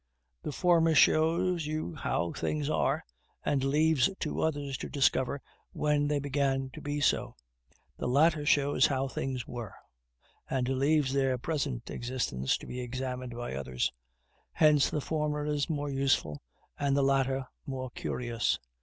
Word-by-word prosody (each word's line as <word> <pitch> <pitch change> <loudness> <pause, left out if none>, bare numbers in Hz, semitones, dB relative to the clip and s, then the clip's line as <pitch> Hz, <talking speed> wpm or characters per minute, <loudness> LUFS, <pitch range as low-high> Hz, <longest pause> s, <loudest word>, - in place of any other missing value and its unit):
The - - -4
former 165 +1 +3
shows 165 +2 +3
you 155 - -3
how 85 +1 -1
things 150 -1 -2
are, - - +1 0.4
and 135 -2 +1
leaves 150 -1 +3
to 155 - -2
others 145 -3 -1
to - - -5
discover 135 -1 +1 0.3
when 150 -1 +1
they 150 0 +1
began 135 -1 0
to - - -9
be 145 0 -2
so. 145 - +1 0.6
The - - -2
latter 150 +4 +3
shows 145 -1 +3
you - - +2
how 135 +1 0
things 130 -2 -3
were, 120 -5 -6 0.7
and 130 -2 0
leaves 135 +1 +2
their 135 -2 +2
present 135 -3 -3
existence 120 - -1
to - - -11
be 125 - -5
examined 125 0 -4
by 120 - -5
others. 65 -2 -1 0.6
Hence 150 -3 +5
the 150 - -2
former 150 -1 -1
is 150 +1 -1
more 145 -2 -2
useful, 135 - +1 0.4
the 140 0 +2
latter 135 -1 +1 0.2
more 130 -2 -4
curious. 120 -1 -1
140 Hz, 145 wpm, -30 LUFS, 130-150 Hz, 0.7 s, Hence